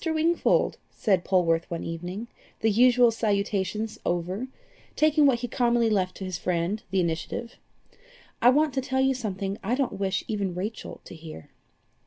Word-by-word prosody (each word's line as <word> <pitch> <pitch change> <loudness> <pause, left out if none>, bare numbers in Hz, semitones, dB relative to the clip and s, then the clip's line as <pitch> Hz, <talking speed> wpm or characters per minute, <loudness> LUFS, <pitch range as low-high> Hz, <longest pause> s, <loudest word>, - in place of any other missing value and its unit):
Wingfold," 325 +1 +1
said 190 -4 +1
Polwarth 170 -3 +1
one 170 - -4
evening, 175 +7 -5 0.3
the 220 - +3
usual 245 +2 +5
salutations 210 0 -1
over, 180 +7 -2 0.5
taking 305 -1 +4
what 240 -3 +2
he 245 - -2
commonly 235 -1 +2
left 185 -3 0
to 190 - -6
his 185 -2 -4
friend 180 +4 -1
the 190 +1 +1
initiative, 175 +7 -3 0.8
"I 245 - +7
want 295 +2 +3
to 265 - 0
tell 265 0 0
you 265 0 +3
something 200 -5 -4
I 225 +6 0
don't 260 -7 -2
wish 190 -1 0
even 200 -5 -2
Rachel 205 +5 -5
to - - -10
hear." 160 - -11
210 Hz, 160 wpm, -26 LUFS, 185-245 Hz, 0.8 s, I